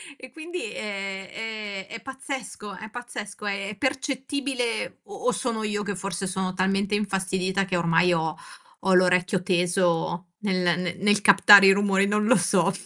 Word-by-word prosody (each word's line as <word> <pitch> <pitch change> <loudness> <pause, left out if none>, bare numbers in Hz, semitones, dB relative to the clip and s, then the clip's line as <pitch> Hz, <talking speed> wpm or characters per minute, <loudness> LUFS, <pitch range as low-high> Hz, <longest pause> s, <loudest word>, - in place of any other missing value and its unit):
e 255 -2 -13
quindi, 350 - -6
ehm, 200 0 -5
è 230 - -7
pazzesco, 265 -6 -7
è 220 - -9
pazzesco, 215 -4 -8
è 200 +1 -3
percettibile 265 -2 -2
o 400 - -13
o - - +4
sono 230 -4 -2
io 210 -1 -2
che 205 -1 -3
forse 195 0 -4
sono 185 0 -2
talmente 195 +2 0
infastidita 190 -1 -1
che 185 - -2
ormai 170 +1 +3
ho 160 -1 -1 0.4
ho 190 - +2
l'orecchio 180 0 +3
teso 175 -1 0
nel 185 -4 0 0.2
n - - -9
nel 205 -1 +3
captare 200 0 +8
i 195 - +8
rumori, 195 0 +2
non 210 +1 +1
lo 255 - +5
so, 185 +1 +2
200 Hz, 155 wpm, -25 LUFS, 185-220 Hz, 0.4 s, captare